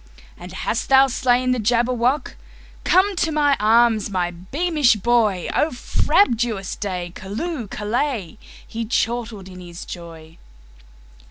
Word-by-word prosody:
"And 175 +1 -11
hast 190 +4 -3
thou 270 0 +7
slain 255 -1 +1
the 250 - 0
Jabberwock? 240 +4 +1 0.5
Come 380 +2 +3
to 325 - +1
my 290 -2 +3
arms, 220 0 +3
my 180 -3 -1
beamish 275 - +1
boy!O 220 - +1
frabjous 235 - +1
day! 180 -4 -4
Callooh! 235 - -5
Callay!"He 225 - -4
chortled 225 -3 -2
in 185 -1 -11
his 175 -1 -9
joy. 165 -2 -10
230 Hz, 110 wpm, -21 LUFS, 190-255 Hz, 0.5 s, thou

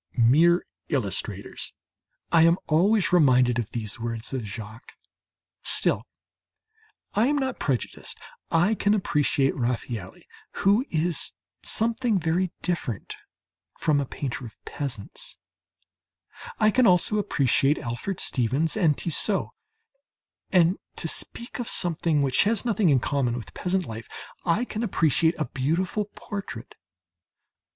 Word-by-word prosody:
"Mere 160 +9 +5 0.2
illustrators!" - - -3 0.6
I 165 - +6
am 165 +2 +5
always 190 +5 +2
reminded 125 -7 +4
of 115 - -3
these 110 -2 -5
words 115 +1 -4
of 130 -4 -3
Jacques. 110 +2 -9 0.7
Still, - - +2 1.1
I 220 +4 +3
am 295 - +2
not 265 -2 -2
prejudiced; 130 -6 -3 0.3
I 175 +6 +3
can 205 -1 +2
appreciate 145 -7 +1
Raffaëlli, 120 -5 -4 0.4
who 205 +5 +5
is 160 0 0 0.3
something 230 0 +2
very 175 +1 0
different 145 - -3 0.6
from 150 -3 +2
a 140 - -4
painter 130 -1 -5
of 115 - -10
peasants; 130 -8 -5 1.2
I 215 - +4
can 255 +2 +4
also 185 +3 +4
appreciate 140 - +2
Alfred 120 +11 -4
Stevens 135 +6 +1
and 165 -9 +2
Tissot. 185 +4 +2 1.0
And, 180 0 +3 0.2
to - - -3
speak 235 +9 -2
of 240 - -3
something 165 -4 +1
which 135 +6 +2
has 220 +2 +1
nothing 215 -6 +2
in 135 -3 +4
common 130 -5 0
with 115 -4 -8
peasant 185 0 -1
life, 110 -1 -7 0.4
I 190 +8 +2
can 220 -2 -5
appreciate 165 - +2
a 155 - -1
beautiful 170 +11 -1
portrait. 195 - -7
160 Hz, 125 wpm, -25 LUFS, 125-195 Hz, 1.2 s, I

